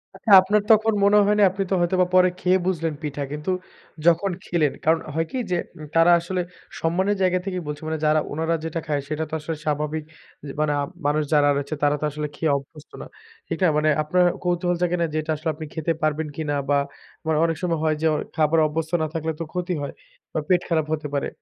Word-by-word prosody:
আচ্ছা, 220 - -2
আপনার 205 +3 +2
তখন 220 0 +5
মনে 205 +1 +5
হয় 210 +1 +3
নাই 205 - +7
আপনি 195 +1 -2
তো - - +3
হয়তোবা 180 +1 +2
পরে 185 0 +6
খেয়ে 185 +1 +3
বুঝলেন 165 -4 -1
পিঠা। 145 -1 -4
কিন্তু 150 +5 -3 0.5
যখন 170 +3 +4
খেলেন 155 -5 +1
কারণ 160 +1 +4
হয় 165 +1 0
কি 260 - -3
যে, 175 - +2 0.2
উ - - -7
তারা 165 +1 +6
আসলে 180 +2 -2 0.4
সম্মানের 190 +5 +1
জায়গা 185 -1 +3
থেকেই 185 -2 -3
বলছে 150 +1 -5
মানে 160 - -1
যারা 155 0 +4
উনারা 160 +2 0
যেটা 165 +1 -3
খায়, 145 -2 0
সেটা 155 +1 -2
তো - - -14
আসলে 160 +2 -4
স্বাভাবিক। 150 +1 -1 0.4
যে 140 - -5
মানে 155 -1 +2
আ - - +1 0.3
মানুষ 150 +1 +2
যারা 145 -1 +5
রয়েছে 140 +2 -3
তারা 145 0 +4
তো - - 0
আসলে 150 +1 -3
খেয়ে 155 -1 0
অভ্যস্ত 145 +2 -12
না। - - -8 0.4
ঠিক - - -2
না? 180 - +6
মানে 155 0 +2
আপনার 180 +4 +2 0.2
কৌতূহল 175 0 +1
জাগেনাই 175 -1 +1
যে 155 - -1
এটা 155 +1 -3
আসলে 155 +2 -3
আপনি 155 0 -7
খেতে 160 0 -1
পারবেন 155 0 0
কিনা 150 -2 -2
বা 145 - +4 0.5
মানে 160 -1 +1
অনেক 165 -1 -1
সময় 170 -3 0
হয় 155 -1 +2
যে, 160 - +3 0.3
খাবার 160 +1 +3
অভ্যস্ত 160 +1 -3
না 155 - 0
থাকলে 160 -1 -2
তো 165 - -2
ক্ষতি 180 0 -2
হয়। 140 - -5 0.4
বা - - 0
পেট 180 -1 +3
খারাপ 160 -3 +1
হতে 150 -1 -3
পারে। 140 - 0
160 Hz, 220 wpm, -23 LUFS, 150-180 Hz, 0.5 s, নাই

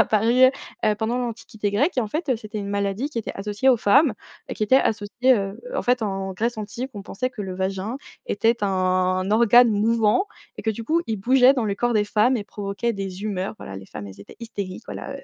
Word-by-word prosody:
est - - +3
apparu, 220 +2 +3 0.5
heu, 215 -1 +3
pendant 230 +3 -1
l'Antiquité 220 -3 -3
grecque, 265 - +1
et - - +5
en 220 - -2
fait, 310 +4 -3
heu, 250 - +2
c'était 215 -1 -7
une 200 -1 -4
maladie 200 +7 -1
qui 235 - -4
était 225 - -4
associée 210 +6 -1
aux 250 - +6
femmes, 220 +5 +4 0.4
qui - - -5
était 235 +5 +5
associée, 230 +2 +2
heu, 195 0 -4
en - - -1
fait, 245 0 +2
en 195 -2 -2
Grèce 230 +5 -2
antique, 235 +5 -5
on 200 - -6
pensait 255 +7 -3
que 210 - -6
le 185 -1 -5
vagin 195 +5 -2 0.3
était 205 +2 -1 0.2
un 185 -1 +1
organe 235 +1 +6
mouvant 225 - +2 0.3
et - - -7
que, 220 - +1
du 225 +1 -6
coup, 325 +7 +2
il 220 - 0
bougeait 255 +5 +5
dans 250 -4 -1
le 200 -2 -1
corps 240 +3 0
des 210 -1 +2
femmes 215 +5 +2
et 210 - -4
provoquait 205 +4 -3
des 195 -1 -6
humeurs, 195 -1 -3
voilà 95 - -8
les 95 - -10
femmes, 100 - -8
elles 95 0 -12
étaient - - -13
hystériques, 200 -5 -6
voilà, - - -6
heu, - - -10
215 Hz, 230 wpm, -23 LUFS, 195-240 Hz, 0.5 s, aux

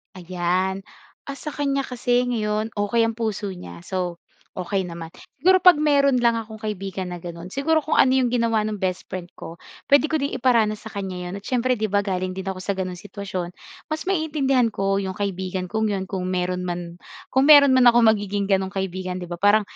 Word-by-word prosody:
Ayan. 185 +2 -1 0.4
Ah, 280 - -5
sa 300 - -6
kanya 275 -1 -1
kasi 245 -1 0
ngayon 220 -2 -1
okey 205 +3 +1
ang 225 - +1
puso 215 -3 -2
niya, 85 - -10
so, 180 - -3 0.4
okey 185 0 -2
naman. 165 -1 -8 0.3
Siguro 370 +2 +5
'pag 360 -1 +8
meron 280 -3 +3
lang 235 - +5
akong 220 -1 -8
kaibigan 195 -4 -4
na 175 - -6
gano'n 170 +1 -8
siguro 315 +3 +1
kung 310 - -1
ano - - +6
'yong 255 -2 +2
ginawa 230 -3 +2
ng 215 -1 -3
bestfriend 185 -1 -4
ko 165 - -8 0.4
pwede 285 +2 +6
ko 315 - +2
din 280 +1 -2
iparanas 225 -4 +2
sa - - -7
kan'ya 185 -3 -5
'yon, - - -6
at - - -23
syempre 255 0 +1
'di 215 - -1
ba 205 0 +3
galing 185 -2 -2
din 190 - -5
ako 190 -1 -3
sa 200 +2 -2
gano'n 185 -1 -4
sitwasyon 190 -3 -6 0.4
mas 310 - -2
maiintindihan 295 -8 +1
ko 195 0 0
'yong 190 -1 -3
kaibigan 185 -2 -3
kong 220 0 0
'yon 190 -1 -2
kung 185 -2 -3
meron 180 0 -1
man, 175 -1 -5 0.3
kung 265 +1 +3
meron 290 -2 +9
man 255 -1 +5
akong 240 -1 +6
magiging 205 -1 -2
gano'ng 190 0 +1
kaibigan 185 -1 -3
'di 175 - -7
ba 175 - -5
parang 205 +2 +5
200 Hz, 200 wpm, -23 LUFS, 185-245 Hz, 0.4 s, meron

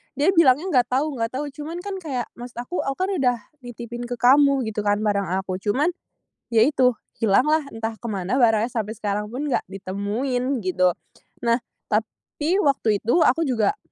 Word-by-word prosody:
dia 300 +7 +3
bilangnya 330 +1 +4
"nggak 245 -3 +3
tahu 270 0 -1
nggak 230 - +1
tahu". 265 +5 -4
Cuman 320 +5 -7
kan 400 -1 -4
kayak, 270 -8 -3 0.2
maksud 245 0 -9
aku, 245 +9 -4
"Aku 270 - -1
kan 375 +2 -1
udah 250 -2 +3 0.2
nitipin 240 -1 -7
ke 245 - -3
kamu," 275 +2 +5
gitu 220 -1 -3
kan, 205 0 +1
"barang 200 -3 +1 0.2
aku." 185 -1 -4
Cuman, 270 - +1 0.6
ya 225 -1 +5
itu, 255 -4 +2 0.2
hilanglah 275 +9 +4
entah 225 0 -4
kemana 215 +2 -1
barangnya, 225 0 +3
sampai 220 -1 -3
sekarang 210 0 -2
pun 260 +6 -4
nggak 275 - +1
ditemuin, 220 +8 -2
gitu. 185 0 +3 0.6
Nah, 235 +1 +2 0.2
tapi 290 - -2
waktu 250 -7 +2
itu 225 +4 -1
aku 320 +2 +3
juga, 255 - +1
245 Hz, 170 wpm, -23 LUFS, 215-280 Hz, 0.6 s, kamu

